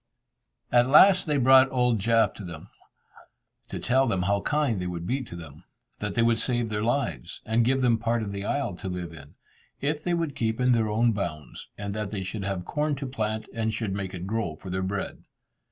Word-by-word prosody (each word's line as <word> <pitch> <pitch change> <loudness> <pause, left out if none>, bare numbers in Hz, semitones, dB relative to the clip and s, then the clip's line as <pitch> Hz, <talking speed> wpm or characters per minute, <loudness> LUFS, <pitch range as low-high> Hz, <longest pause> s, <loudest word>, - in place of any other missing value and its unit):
At 120 +1 +4
last 185 +5 +7
they 150 -1 +1
brought 130 0 +6
old 125 -3 +2
Jaf 115 +2 +3
to 105 - -9
them, 85 -4 -9 1.0
to - - -6
tell 130 +2 +2
them 95 -5 0
how 100 +2 +1
kind 145 -9 0
they 90 - -3
would 85 -1 -5
be 130 +8 -1
to 115 -9 -9
them, 80 -1 -11 0.4
that 105 -1 -3
they 115 - +3
would 115 -1 +3
save 120 -3 0
their 105 -1 -2
lives, 120 -6 -2
and 115 +1 +2
give 130 +2 +1
them 115 -2 +3
part 115 0 0
of 100 - -4
the 100 0 -4
isle 120 -1 -1
to 95 - -5
live 90 -2 -5
in, 70 -2 -13 0.4
if 150 +2 -1
they 175 -1 +1
would 165 -5 -2
keep 110 -2 -1
in 125 0 +3
their 115 -3 +2
own 115 +3 +3
bounds, 85 - -5
and 100 -1 -4
that 105 -1 -3
they 100 -2 -4
should 100 +2 -5
have 95 -2 -3
corn 150 0 -1
to 135 +1 -5
plant, 110 -4 -3
and 110 -1 -1
should 105 -3 -2
make 95 -1 -4
it 90 0 -6
grow 100 -6 -2
for 90 +4 -9
their 95 +1 -1
bread. 95 +1 -3
110 Hz, 220 wpm, -26 LUFS, 95-125 Hz, 1.0 s, last